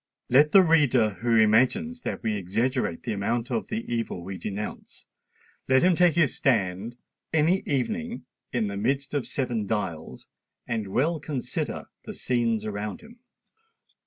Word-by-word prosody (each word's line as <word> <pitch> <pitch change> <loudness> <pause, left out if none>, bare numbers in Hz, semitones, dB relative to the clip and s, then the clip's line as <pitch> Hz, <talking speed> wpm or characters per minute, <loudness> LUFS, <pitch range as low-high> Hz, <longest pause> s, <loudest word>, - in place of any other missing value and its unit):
Let 145 +4 +5
the 195 - +8
reader 145 -10 +4
who 120 -1 +2
imagines 130 - +3
that - - -4
we 110 -2 0
exaggerate 110 +2 -1
the 120 -4 -2
amount 115 +5 -2
of 115 - -1
the 220 +2 -4
evil 115 -7 -3
we 95 +2 -6
denounce,—let 105 - -4
him 180 -1 +5
take 175 -1 +4
his 165 -5 +2
stand, 105 -2 0 0.4
any 160 +4 +3
evening, 225 - -2 0.3
in 120 -3 0
the 100 -1 -4
midst 135 +7 -1
of 145 -3 -1
Seven 120 -6 -2
Dials, 95 -7 -4 0.4
and 110 -3 -2
well 150 - 0
consider 145 -3 -3 0.2
the - - -6
scenes 115 -3 0
around 105 0 -4
him. 230 +2 -16
120 Hz, 145 wpm, -26 LUFS, 105-150 Hz, 0.4 s, the